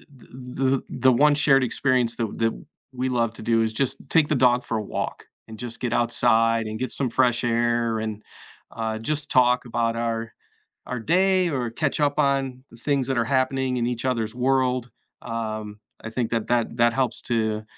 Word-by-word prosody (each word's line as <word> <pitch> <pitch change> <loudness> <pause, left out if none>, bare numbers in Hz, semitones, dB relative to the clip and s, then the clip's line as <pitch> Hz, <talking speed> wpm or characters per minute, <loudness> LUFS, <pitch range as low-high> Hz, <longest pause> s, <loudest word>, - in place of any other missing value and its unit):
the, 125 - -18
the 130 +1 -3
the 135 -1 0
the 130 - +3
one 145 +4 +5
shared 140 -2 +4
experience 125 -1 +1
that 115 - -1
that 115 0 +1 0.4
we 130 +1 -2
love 115 -3 0
to - - -10
do 115 0 +2
is 110 0 -2
just 130 +3 0
take 160 -3 +4
the 150 - +1
dog 125 -1 +3
for 115 - -2
a - - -2
walk - - -5 0.2
and 110 - -10
just 120 -1 -6
get 125 - -2
outside 115 -1 +3
and 110 0 -5
get 130 -2 -3
some 135 -3 +2
fresh 120 -1 +2
air 120 -1 +1
and, 110 -1 -4 0.5
uh, 110 -1 -3
just 150 +5 -2
talk 125 -1 +4
about 115 -1 -1
our 115 -1 -2 0.6
our 125 - -4
day 185 - +2
or 130 -5 -2
catch 140 +5 -2
up 145 0 +1
on 135 -3 0
the - - -15
things 140 +1 0
that 130 -2 0
are 115 - +2
happening 130 0 0
in 120 -1 0
each 120 0 -3
other's 115 -4 -1
world. 125 -1 +1 0.3
Um, 110 -2 -5 0.2
I 115 - -6
think 115 0 -2
that 115 -2 -1
that 120 -1 0
that 120 0 +4
helps 130 -1 0
to, 110 -2 -1
120 Hz, 200 wpm, -24 LUFS, 115-130 Hz, 0.6 s, one